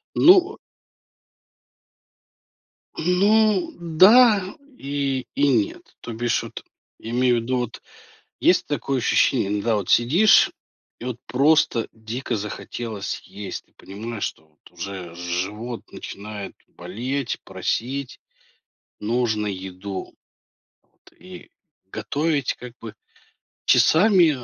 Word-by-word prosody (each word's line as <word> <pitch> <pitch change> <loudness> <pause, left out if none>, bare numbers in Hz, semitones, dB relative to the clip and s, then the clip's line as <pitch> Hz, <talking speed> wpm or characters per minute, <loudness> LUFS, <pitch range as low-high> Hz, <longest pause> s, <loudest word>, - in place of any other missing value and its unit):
Ну 370 +3 +6 2.4
Ну, 200 +3 +3
да. 195 +4 +5 0.2
И 135 -2 -2
и 145 0 +2
нет, 115 -7 -1
то 115 - -7
бишь 120 +1 0
вот - - -9 0.4
я 115 - -8
имею 125 0 +3
в - - -1
виду, 125 +3 -1
вот 120 -2 -4 0.6
есть - - +3
такое 135 -1 -1
ощущение- 115 -2 +2
иногда 105 +2 0
вот 100 -4 -3
сидишь 165 - +5 0.5
и - - -8
вот 125 -2 -4
просто 135 -2 +2
дико 115 +3 -4
захотелось 105 0 -5
есть, 100 -1 -8
и - - -36
понимаешь, 110 +2 -7
что 80 - -5
вот 75 -1 -23
уже 90 -1 -7
живот 95 +7 -4
начинает 105 0 -8
болеть, 120 +9 -4
просить. 120 +8 -3 0.8
Нужно 110 -1 0
еду. 95 0 -6 0.7
Вот. - - -26
И 180 0 -12 0.4
готовить 140 +8 -1
как 125 -1 -10
бы 110 -2 -8 0.7
часами 180 -1 +5
120 Hz, 105 wpm, -23 LUFS, 105-145 Hz, 2.4 s, Ну